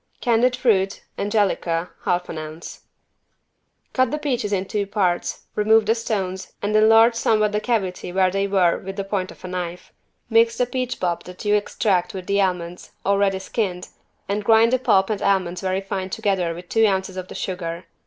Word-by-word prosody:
Candied 245 +1 +2
fruit 195 -6 +1 0.2
(angelica) 190 -5 0
half 180 0 0
an 160 - -5
ounce. 155 +2 -8 1.1
Cut 255 0 +2
the 300 - -2
peaches 255 -8 -2
in 195 -1 0
two 200 0 -2
parts, 185 -4 -1
remove 215 +1 +4
the 220 - +3
stones 195 -5 -3
and 205 +1 -1
enlarge 225 +2 +6
somewhat 215 -2 +2
the 210 - 0
cavity 200 -6 -2
where 185 0 +2
they 195 +1 0
were 185 -4 +2
with 195 +1 -7
the 200 - -3
point 195 -2 -2
of - - -12
a - - -4
knife. 180 -1 -5 0.3
Mix 230 0 +3
the 250 - +2
peach 255 0 -3
pulp 175 -2 -1
that 180 +3 -10
you 205 - +3
extract 205 -2 0
with 185 -1 -6
the 200 +1 +1
almonds, 180 -2 -3
already 200 -1 +2
skinned, 190 -2 -3 0.4
and 205 +1 -1
grind 225 +3 +5
the 255 - +3
pulp 195 -4 +3
and 210 - -2
almonds 185 -3 +1
very 190 0 -1
fine 195 -1 -4
together 190 -5 -1
with 175 +1 -10
two 225 +3 +3
ounces 190 -1 -1
of 185 -1 -5
the - - -10
sugar. 175 -2 -4
195 Hz, 185 wpm, -22 LUFS, 185-220 Hz, 1.1 s, enlarge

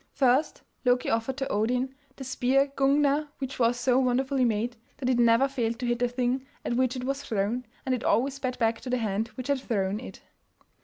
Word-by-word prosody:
First, 265 +3 +2 0.2
Loki 250 -1 +2
offered 230 +4 -1
to 270 -1 -2
Odin 250 +5 0 0.2
the 270 - -8
spear 265 +2 +1
Gungner 285 +2 +3
which 265 -1 -5
was 240 0 +2
so 250 +1 +3
wonderfully 260 +1 +1
made 230 +1 0 0.2
that 260 -3 -2
it 245 - +1
never 235 +3 +5
failed 235 -4 -2
to 250 - -4
hit 240 0 0
the 245 - +2
thing 250 +1 -1 0.2
at - - -1
which 255 +1 +1
it 250 - -4
was 275 +2 -2
thrown, 225 +1 -1 0.2
and 260 - +1
it 250 - -2
always 260 +5 +2
sped 255 -2 -3
back 225 -1 +1
to 255 - -6
the 250 - +1
hand 220 -1 -1
which 255 -1 -6
had 280 -2 +1
thrown 205 -4 -1
it. 250 - -10
250 Hz, 210 wpm, -27 LUFS, 235-265 Hz, 0.2 s, never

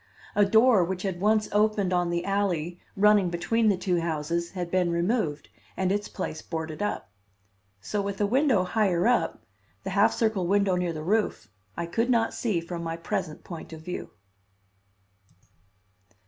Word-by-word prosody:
A 205 - +5
door 220 -1 +5
which 185 +1 -3
had 185 -3 -3
once 215 +1 +3
opened 210 -3 +2
on 175 -1 +1
the 170 0 -1
alley 180 -4 -1 0.2
running 205 -2 +5
between 215 +6 +1
the 200 - +2
two 180 -1 0
houses 170 +1 -2
had 175 -2 -4
been 185 -2 +2
removed 170 -3 0 0.3
and 190 0 +1
its 205 +1 -1
place 155 - -5
boarded 160 0 -5
up. 205 - -3 0.7
So 205 - -2
with 200 -1 -4
a 205 - +3
window 250 -3 +3
higher 185 -1 +1
up; 245 0 +1 0.4
the - - -4
half - - +4
circle 220 -6 0
window 200 -1 +2
near 180 -1 0
the 155 -1 -5
roof, 190 - 0 0.3
I 170 - -2
could 230 +8 -1
not 230 -2 +2
see 210 -8 0
from 170 0 -6
my 165 0 -4
present 160 -2 -4
point 165 -2 -9
of 160 - -9
view. 180 +3 -6
185 Hz, 165 wpm, -27 LUFS, 170-210 Hz, 0.7 s, A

